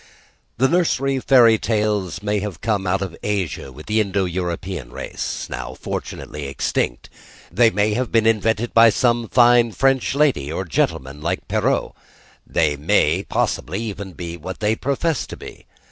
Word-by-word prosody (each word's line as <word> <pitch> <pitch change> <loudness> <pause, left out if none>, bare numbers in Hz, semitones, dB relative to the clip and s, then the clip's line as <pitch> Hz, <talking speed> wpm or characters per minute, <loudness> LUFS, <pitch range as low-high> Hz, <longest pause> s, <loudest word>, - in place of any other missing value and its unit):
The 130 +4 +4
nursery 135 -5 +1
fairy 120 -4 +5
tales 105 -4 -1
may 105 0 0
have 100 -4 -5
come 105 -4 -1
out 95 +2 +1
of 90 -4 -6
Asia 95 -9 -2
with 75 +4 -12
the 110 +1 +2
Indo 100 -2 0
European 90 -4 -4
race, - - -5
now - - -6
fortunately 75 -2 -6
extinct; 65 -2 -2 0.4
they 115 +5 +5
may 105 +1 +1
have 125 +2 -2
been 115 -1 +3
invented 115 +1 +1
by 115 0 +7
some 120 +1 +1
fine 120 -1 +5
French 135 0 +1
lady 135 - +2
or 95 +4 -3
gentleman 70 -3 -1
like 85 +4 -3
Perrault: - - 0 0.5
they 75 -3 +1
may 80 +2 +2
possibly 95 -1 -2
even 100 -4 -6
be 85 -2 -6
what 95 +3 -7
they 105 +1 +1
profess 140 +4 -1
to - - -8
be. - - -12
105 Hz, 160 wpm, -21 LUFS, 90-115 Hz, 0.5 s, by